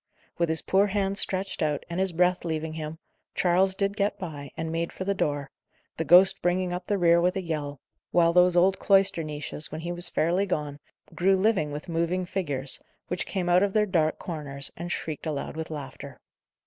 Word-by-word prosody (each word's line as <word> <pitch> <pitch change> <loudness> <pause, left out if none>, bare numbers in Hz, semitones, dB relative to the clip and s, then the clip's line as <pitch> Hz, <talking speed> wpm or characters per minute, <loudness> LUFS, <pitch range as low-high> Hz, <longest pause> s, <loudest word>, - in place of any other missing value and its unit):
With 170 -1 +2
his 160 0 +1
poor 195 +2 +3
hands 200 0 -1
stretched 190 +1 -2
out, 150 -2 0
and 170 +1 -4
his 190 -1 +1
breath 180 +2 +2
leaving 160 -1 -3
him, 155 0 -6 0.4
Charles 185 +2 +2
did 200 +1 -1
get 205 0 0
by, 150 -7 -7
and 160 0 -3
made 165 +1 -2
for - - -6
the 200 +1 0
door, 145 -6 -2 0.4
the 160 - -2
ghost 185 +5 +6
bringing 180 0 0
up 180 0 -5
the 205 - +1
rear 170 -1 +4
with 180 +2 +1
a 190 - -2
yell, 145 -4 -4 0.3
while 170 -1 +3
those 180 0 +5
old 190 +2 +4
cloister 195 -3 +3
niches, 150 0 -5
when 160 - -5
he 170 +1 -4
was 175 0 -1
fairly 180 +5 +1
gone, 150 -5 -3 0.3
grew 190 +2 +3
living 190 -6 +1
with 145 +1 -6
moving 170 +2 -1
figures, 145 -8 -1 0.3
which 180 +1 -2
came 185 -3 -2
out 175 +1 +4
of 200 -1 +1
their 215 -1 +3
dark 165 -5 +1
corners, 145 -5 -4
and 175 +1 -6
shrieked 155 -1 -4
aloud 150 -1 -4
with 160 0 -5
laughter. 140 -2 -8
175 Hz, 200 wpm, -26 LUFS, 155-190 Hz, 0.4 s, ghost